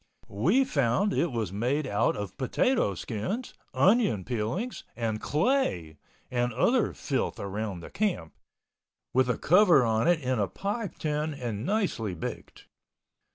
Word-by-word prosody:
We 175 Hz, -, +3 dB
found 185 Hz, -, +1 dB
it 170 Hz, -, +1 dB
was 110 Hz, -6 st, -3 dB
made 130 Hz, +8 st, 0 dB
out 110 Hz, -3 st, +1 dB
of 100 Hz, -2 st, -5 dB
potato 130 Hz, -, +1 dB
skins, 125 Hz, -, -4 dB, 0.2 s
onion 195 Hz, -, +3 dB
peelings 125 Hz, -, -3 dB
and 110 Hz, -2 st, -2 dB
clay, 150 Hz, -, 0 dB, 0.3 s
and 120 Hz, 0 st, 0 dB
other 240 Hz, -, +2 dB
filth 135 Hz, -3 st, -2 dB
around 100 Hz, -2 st, -4 dB
the -, -, -10 dB
camp, 185 Hz, -, -1 dB, 0.8 s
with 130 Hz, 0 st, +3 dB
a 125 Hz, -, +1 dB
cover 180 Hz, -, +5 dB
on 110 Hz, +4 st, +1 dB
it 175 Hz, -2 st, +4 dB
in 130 Hz, -4 st, -1 dB
a 100 Hz, -, +1 dB
pie 200 Hz, -, -3 dB
tin 150 Hz, 0 st, -2 dB
and 120 Hz, -3 st, -4 dB
nicely 185 Hz, -, -1 dB
baked. 80 Hz, -, -7 dB
130 Hz, 140 wpm, -28 LUFS, -, 0.8 s, cover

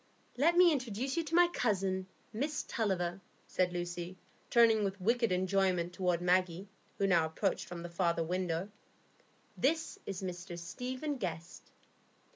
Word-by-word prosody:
"Let 330 Hz, +7 st, +3 dB
me 355 Hz, -1 st, +8 dB
introduce 255 Hz, -1 st, -2 dB
you 335 Hz, -, +1 dB
to 320 Hz, +2 st, -2 dB
my 350 Hz, 0 st, +7 dB
cousin, 195 Hz, -, 0 dB, 0.3 s
Miss 290 Hz, +7 st, -2 dB
Tulliver," 190 Hz, -4 st, -1 dB, 0.2 s
said 180 Hz, -1 st, 0 dB
Lucy, 175 Hz, +1 st, -4 dB, 0.3 s
turning 225 Hz, -2 st, +5 dB
with 195 Hz, 0 st, -2 dB
wicked 230 Hz, +3 st, +2 dB
enjoyment 185 Hz, -1 st, +1 dB
toward 180 Hz, -2 st, 0 dB
Maggie, 180 Hz, +1 st, +1 dB, 0.3 s
who 200 Hz, -, +1 dB
now 175 Hz, -4 st, +4 dB
approached 170 Hz, +5 st, -1 dB
from 170 Hz, -1 st, -7 dB
the -, -, -4 dB
farther 170 Hz, -1 st, +1 dB
window. 180 Hz, +2 st, -2 dB, 0.8 s
"This 320 Hz, +4 st, 0 dB
is 195 Hz, -1 st, -4 dB
Mr 180 Hz, -1 st, -5 dB
Stephen 255 Hz, -, -4 dB
Guest." 170 Hz, -5 st, -6 dB
190 Hz, 140 wpm, -33 LUFS, 175-240 Hz, 0.8 s, me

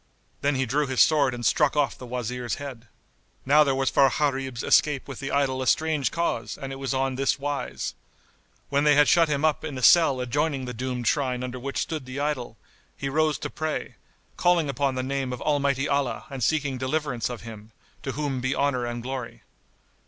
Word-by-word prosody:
Then 145 Hz, 0 st, +1 dB
he 130 Hz, 0 st, +1 dB
drew 140 Hz, +4 st, 0 dB
his 130 Hz, -1 st, -2 dB
sword 145 Hz, -4 st, +5 dB
and 120 Hz, -1 st, -5 dB
struck 145 Hz, +6 st, +3 dB
off 140 Hz, -5 st, +2 dB
the 125 Hz, -, -10 dB
Wazir's 125 Hz, 0 st, -3 dB
head. 130 Hz, -5 st, -8 dB, 0.6 s
Now 150 Hz, +3 st, +6 dB
there 135 Hz, -2 st, +1 dB
was 135 Hz, 0 st, 0 dB
for 135 Hz, -1 st, +5 dB
Gharib's 135 Hz, -2 st, -1 dB
escape 145 Hz, -3 st, +3 dB
with 135 Hz, -3 st, -7 dB
the 135 Hz, -, -4 dB
idol 135 Hz, -2 st, +1 dB
a 130 Hz, -, -2 dB
strange 155 Hz, -6 st, +2 dB
cause 120 Hz, -10 st, -2 dB
and 135 Hz, 0 st, -6 dB
it -, -, -7 dB
was 135 Hz, 0 st, -3 dB
on 135 Hz, -1 st, 0 dB
this 135 Hz, 0 st, +1 dB
wise. 145 Hz, 0 st, -3 dB, 0.8 s
When 140 Hz, +1 st, +2 dB
they 150 Hz, -1 st, +5 dB
had 145 Hz, 0 st, +5 dB
shut 165 Hz, -2 st, +4 dB
him 145 Hz, +1 st, +1 dB
up 155 Hz, -2 st, +1 dB
in 150 Hz, -4 st, -5 dB
a 130 Hz, -, -5 dB
cell 150 Hz, -3 st, +6 dB
adjoining 135 Hz, +2 st, -1 dB
the 125 Hz, -, -5 dB
doomed 125 Hz, 0 st, -4 dB
shrine 125 Hz, -1 st, 0 dB
under 125 Hz, 0 st, -5 dB
which 135 Hz, +2 st, -5 dB
stood 155 Hz, -6 st, -4 dB
the 130 Hz, +2 st, -5 dB
idol, 135 Hz, -6 st, -2 dB, 0.4 s
he 135 Hz, -, -3 dB
rose 155 Hz, 0 st, +1 dB
to -, -, -5 dB
pray, 155 Hz, 0 st, -3 dB, 0.4 s
calling 175 Hz, -4 st, +3 dB
upon 135 Hz, 0 st, 0 dB
the 130 Hz, -, -2 dB
name 135 Hz, -1 st, -2 dB
of 125 Hz, -, -5 dB
Almighty 140 Hz, -2 st, +1 dB
Allah 140 Hz, 0 st, -1 dB
and 135 Hz, -3 st, -4 dB
seeking 145 Hz, -1 st, 0 dB
deliverance 130 Hz, -3 st, -1 dB
of 120 Hz, -2 st, -6 dB
Him, 110 Hz, -1 st, -10 dB, 0.3 s
to 135 Hz, -, -4 dB
whom 140 Hz, -2 st, -2 dB
be 130 Hz, +2 st, 0 dB
honour 130 Hz, -4 st, 0 dB
and 120 Hz, 0 st, -5 dB
glory! 125 Hz, -, -6 dB
135 Hz, 205 wpm, -25 LUFS, 125-145 Hz, 0.8 s, Now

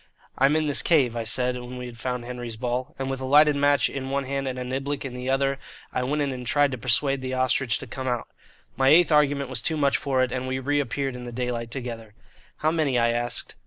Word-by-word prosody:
"I'm 135 Hz, +3 st, +3 dB
in 155 Hz, 0 st, +1 dB
this 145 Hz, -2 st, +2 dB
cave," 135 Hz, -8 st, +3 dB
I 115 Hz, -, -2 dB
said, 125 Hz, +2 st, 0 dB
when 125 Hz, +1 st, -8 dB
we 125 Hz, -, -6 dB
had 120 Hz, -2 st, -10 dB
found 125 Hz, 0 st, -3 dB
Henry's 120 Hz, -2 st, -6 dB
ball; 125 Hz, +2 st, -3 dB
and 135 Hz, 0 st, -3 dB
with 135 Hz, 0 st, -3 dB
a -, -, -3 dB
lighted 150 Hz, +2 st, +5 dB
match 145 Hz, 0 st, +3 dB
in 135 Hz, -1 st, -5 dB
one 140 Hz, 0 st, 0 dB
hand 135 Hz, 0 st, -3 dB
and 130 Hz, -1 st, -3 dB
a 125 Hz, -, -3 dB
niblick 135 Hz, +3 st, -3 dB
in 130 Hz, -, -5 dB
the 125 Hz, +1 st, -4 dB
other 135 Hz, +1 st, +1 dB, 0.3 s
I -, -, 0 dB
went 145 Hz, +4 st, 0 dB
in 140 Hz, -, -1 dB
and 125 Hz, -1 st, -6 dB
tried 145 Hz, 0 st, +3 dB
to 130 Hz, -, -3 dB
persuade 135 Hz, +3 st, +1 dB
the 130 Hz, 0 st, -3 dB
"Ostrich" 130 Hz, -2 st, +1 dB
to -, -, -8 dB
come 130 Hz, +2 st, -6 dB
out. 120 Hz, -2 st, -1 dB, 0.5 s
My 130 Hz, +1 st, +2 dB
eighth 165 Hz, +2 st, +6 dB
argument 145 Hz, -2 st, +2 dB
was 125 Hz, -3 st, +2 dB
too 160 Hz, +6 st, 0 dB
much 140 Hz, -2 st, +2 dB
for 130 Hz, -2 st, +1 dB
it, 130 Hz, -, -1 dB
and 130 Hz, +1 st, -3 dB
we 130 Hz, 0 st, -1 dB
reappeared 140 Hz, -1 st, -1 dB
in 125 Hz, 0 st, -7 dB
the 120 Hz, -, -6 dB
daylight 120 Hz, -1 st, -3 dB
together. 115 Hz, -3 st, -6 dB, 0.5 s
"How 155 Hz, +1 st, +3 dB
many?" 155 Hz, -6 st, +1 dB
I 115 Hz, 0 st, +3 dB
asked. 120 Hz, 0 st, -2 dB
130 Hz, 250 wpm, -25 LUFS, 125-140 Hz, 0.5 s, eighth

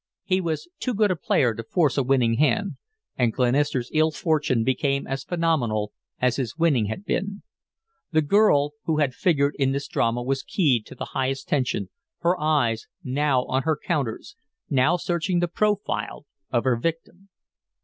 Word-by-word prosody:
He 185 Hz, 0 st, +1 dB
was 165 Hz, -, -3 dB
too 250 Hz, -3 st, -2 dB
good 210 Hz, -1 st, +3 dB
a -, -, +1 dB
player 130 Hz, -6 st, +1 dB
to 115 Hz, -, -6 dB
force 150 Hz, +3 st, +1 dB
a 140 Hz, -, +2 dB
winning 125 Hz, -3 st, +2 dB
hand, 160 Hz, +2 st, +1 dB, 0.4 s
and 120 Hz, -2 st, +3 dB
Glenister's 125 Hz, +1 st, +1 dB
ill 155 Hz, 0 st, +4 dB
fortune 150 Hz, -5 st, 0 dB
became 135 Hz, +2 st, 0 dB
as 135 Hz, 0 st, -4 dB
phenomenal 130 Hz, -13 st, 0 dB, 0.3 s
as 125 Hz, -1 st, +1 dB
his 130 Hz, -1 st, -3 dB
winning 155 Hz, -10 st, +3 dB
had 110 Hz, -, -5 dB
been. 200 Hz, +1 st, -2 dB, 0.7 s
The 155 Hz, -1 st, +3 dB
girl 145 Hz, -5 st, +4 dB
who 155 Hz, -2 st, +1 dB
figured 145 Hz, -1 st, +1 dB
in 135 Hz, -1 st, +2 dB
this 140 Hz, 0 st, -3 dB
drama 115 Hz, +1 st, 0 dB
was 135 Hz, +1 st, -1 dB
keyed 130 Hz, -, +1 dB
to -, -, -11 dB
the -, -, -5 dB
highest 135 Hz, 0 st, -1 dB
tension, 125 Hz, -8 st, 0 dB, 0.3 s
her 175 Hz, +1 st, +3 dB
eyes 140 Hz, -8 st, +1 dB, 0.2 s
now 135 Hz, -2 st, +1 dB
on 130 Hz, +1 st, 0 dB
her 155 Hz, +1 st, 0 dB
counters, 140 Hz, -9 st, -3 dB, 0.4 s
now 140 Hz, +6 st, +3 dB
searching 175 Hz, +1 st, -1 dB
the 175 Hz, -, +1 dB
profile 205 Hz, -3 st, -1 dB, 0.2 s
of 120 Hz, -2 st, +1 dB
her 130 Hz, -3 st, +2 dB
victim. 165 Hz, +7 st, -4 dB
140 Hz, 165 wpm, -24 LUFS, 125-170 Hz, 0.7 s, ill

